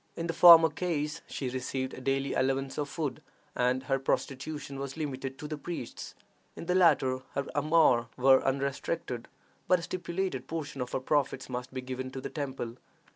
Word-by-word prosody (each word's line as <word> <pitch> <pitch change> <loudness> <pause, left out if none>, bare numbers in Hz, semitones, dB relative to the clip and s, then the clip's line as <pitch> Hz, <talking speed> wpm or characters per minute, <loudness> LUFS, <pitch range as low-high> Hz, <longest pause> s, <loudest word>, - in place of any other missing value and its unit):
In 165 - -3
the 165 - -2
former 165 -1 +9
case, 150 -3 -2
she 135 - -4
received 130 +1 -3
a - - -8
daily 135 +1 0
allowance 135 +1 0
of 145 -1 -2
food, 150 -2 -3 0.3
and 125 +1 +1
her 135 -1 0
prostitution 140 +1 -3
was 140 +1 -5
limited 135 -3 -4
to 150 - -6
the 150 -1 -5
priests; 165 -6 -6 0.4
in - - -7
the 180 - +1
latter, 135 -8 +4
her 140 0 -1
amours 145 -5 +4
were 130 +1 +5
unrestricted, 135 -1 -2 0.4
but 180 - +5
a 170 - -7
stipulated 175 -6 -3
portion 150 -4 -4
of 125 - -4
her - - +1
profits 140 +1 0
must 125 0 -5
be 130 -1 -4
given 130 0 -5
to 130 - -6
the - - -6
temple. 130 -5 -4
135 Hz, 180 wpm, -30 LUFS, 130-155 Hz, 0.4 s, former